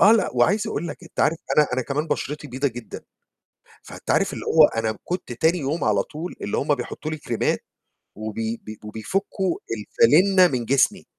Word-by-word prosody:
آه، 210 Hz, -, +8 dB
لأ، 225 Hz, -, +2 dB
وعايز 200 Hz, -, +3 dB
أقول 175 Hz, -5 st, -3 dB
لك -, -, -7 dB
أنت 170 Hz, -, -6 dB
عارف 160 Hz, +2 st, +2 dB, 0.2 s
أنا 150 Hz, -, +6 dB
أنا 130 Hz, 0 st, 0 dB
كمان 145 Hz, +5 st, -2 dB
بشرتي 150 Hz, -1 st, -3 dB
بيضة 135 Hz, +3 st, 0 dB
جدًا، 120 Hz, -1 st, -9 dB, 0.8 s
فأنت -, -, -8 dB
عارف -, -, +2 dB
اللي -, -, -6 dB
هو 160 Hz, -1 st, +7 dB
أنا 110 Hz, -2 st, -2 dB
كنت 175 Hz, -7 st, -4 dB
تاني 160 Hz, +8 st, +2 dB
يوم 150 Hz, +2 st, -2 dB
على 105 Hz, -3 st, +3 dB
طول، 165 Hz, +4 st, -7 dB
اللي 100 Hz, -, -2 dB
هم 145 Hz, +1 st, +2 dB
بيحطّوا 140 Hz, +4 st, -5 dB
لي 155 Hz, -, -4 dB
كريمات، 120 Hz, -5 st, -1 dB, 0.5 s
وبي 110 Hz, +2 st, -3 dB
ب 110 Hz, 0 st, -9 dB
وبيفكّوا 180 Hz, -, -2 dB, 0.2 s
الفَلنة 180 Hz, -, +5 dB
من 125 Hz, -7 st, -2 dB
جسمي. 135 Hz, +3 st, +2 dB
145 Hz, 180 wpm, -23 LUFS, 115-170 Hz, 0.8 s, آه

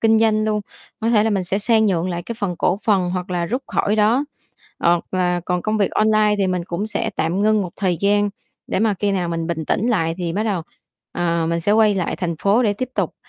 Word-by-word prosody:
kinh 225 Hz, -1 st, +4 dB
doanh 215 Hz, -1 st, +2 dB
luôn. 215 Hz, -1 st, 0 dB, 0.4 s
Có 225 Hz, +1 st, +1 dB
thể 215 Hz, -2 st, +4 dB
là 225 Hz, -, +1 dB
mình 195 Hz, -3 st, 0 dB
sẽ 190 Hz, +3 st, -1 dB
sang 220 Hz, +1 st, +3 dB
nhượng 180 Hz, -3 st, 0 dB
lại 175 Hz, 0 st, -3 dB
cái 235 Hz, -, -6 dB
phần 190 Hz, -5 st, -2 dB
cổ 185 Hz, +3 st, +1 dB
phần 190 Hz, -5 st, +2 dB
hoặc 180 Hz, 0 st, -4 dB
là 175 Hz, -1 st, -1 dB
rút 250 Hz, +7 st, -2 dB
khỏi 210 Hz, +2 st, 0 dB
đó, 225 Hz, +6 st, +3 dB, 0.5 s
hoặc 170 Hz, 0 st, +2 dB
là 180 Hz, -1 st, +1 dB
còn 180 Hz, 0 st, -2 dB
công 215 Hz, 0 st, 0 dB
việc 200 Hz, -, +2 dB
online 215 Hz, -1 st, +3 dB
thì 195 Hz, -, +2 dB
mình 180 Hz, -2 st, -1 dB
cũng 175 Hz, +4 st, -3 dB
sẽ 220 Hz, -, -2 dB
tạm 170 Hz, +4 st, 0 dB
ngưng 215 Hz, 0 st, +3 dB
một 180 Hz, -, -5 dB
thời 185 Hz, -3 st, 0 dB
gian, 205 Hz, +1 st, +2 dB, 0.4 s
để -, -, -1 dB
mà 220 Hz, -2 st, +2 dB
khi 200 Hz, +2 st, -1 dB
nào 180 Hz, -3 st, -1 dB
mình 165 Hz, -1 st, -2 dB
bình 160 Hz, -2 st, -3 dB
tĩnh 210 Hz, -, 0 dB
lại 165 Hz, -8 st, +1 dB
thì 175 Hz, -2 st, -2 dB
bắt 205 Hz, +5 st, -1 dB
đầu, 200 Hz, -6 st, -1 dB, 0.5 s
ờ, 170 Hz, -1 st, 0 dB
mình 170 Hz, 0 st, 0 dB
sẽ 205 Hz, -, +1 dB
quay 215 Hz, -1 st, +4 dB
lại 185 Hz, -3 st, -2 dB
thành 175 Hz, -3 st, -2 dB
phố 200 Hz, +7 st, +3 dB
để 215 Hz, -4 st, +2 dB
tiếp 255 Hz, +5 st, -4 dB
tục. -, -, -1 dB
200 Hz, 255 wpm, -20 LUFS, 175-215 Hz, 0.5 s, kinh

